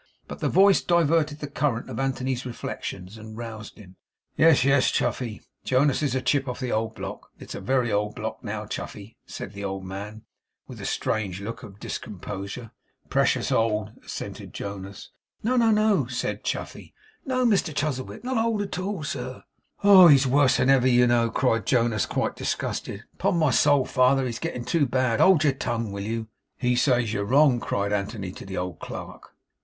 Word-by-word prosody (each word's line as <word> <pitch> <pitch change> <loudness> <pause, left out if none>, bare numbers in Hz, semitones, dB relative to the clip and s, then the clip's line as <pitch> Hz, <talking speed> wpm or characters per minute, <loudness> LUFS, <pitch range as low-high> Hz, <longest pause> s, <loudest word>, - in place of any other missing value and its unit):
But - - -8
the - - 0
voice 195 0 +5
diverted 160 -3 +2
the 145 - -3
current 140 -4 -1
of - - -6
Anthony's 130 -1 -1
reflections, 110 -4 -6
and 110 0 -10
roused 110 -2 -8
him. 95 -3 -15 0.4
'Yes, 160 -5 +5
yes, 135 -1 +4
Chuffey, 115 -5 -2 0.2
Jonas 135 +2 +2
is 140 -4 0
a 130 - -1
chip 140 -2 +1
of 125 - -4
the 130 -2 -3
old 110 0 -1
block. 95 -2 -7
It - - -12
is - - -5
a - - -6
very 125 -3 +1
old 105 +1 0
block, 110 +1 -5
now, 105 -1 -4
Chuffey,' 105 +1 -7
said 100 - -7
the 100 0 -7
old 95 -1 -4
man, 100 +3 -7 0.4
with - - -10
a - - -4
strange 100 -4 -2
look 105 +3 -6
of 105 -5 -12
discomposure. 100 +4 -6 0.4
'Precious - - +2
old,' 105 -2 +1
assented - - -7
Jonas 100 -1 -7 0.3
'No, 245 +4 +1
no, 235 -2 +4
no,' 215 -1 +3
said - - -3
Chuffey. - - -5 0.3
'No, 255 -2 0
Mr 200 -7 +2
Chuzzlewit. 145 - -3
Not 250 -3 0
old 225 -3 0
at 195 -2 -5
all, 190 -3 -3
sir.' 130 -3 -5 0.4
'Oh! 195 -3 +9
He's 140 -3 +6
worse 135 +1 +4
than 130 - +3
ever, 130 -2 +4
you 125 -1 +5
know!' 120 -1 +3
cried 115 -4 0
Jonas, 115 -4 +2
quite - - -1
disgusted. - - -3
'Upon - - 0
my 155 -4 +3
soul, 145 +1 +4
father, 130 0 +3
he's 120 -2 -4
getting 125 -7 -4
too 155 -5 +2
bad. 125 -2 +1
Hold 185 -5 +5
your 145 -3 +3
tongue, 115 -4 -3
will 100 0 -5
you?' 110 +2 -3 0.3
'He 125 -1 +1
says 120 -4 +2
you're 100 - -1
wrong!' 130 +3 +4
cried 100 -1 -1
Anthony 100 -1 -3
to - - -10
the 95 - -5
old 90 -2 -4
clerk. - - -9
125 Hz, 185 wpm, -25 LUFS, 105-145 Hz, 0.4 s, Oh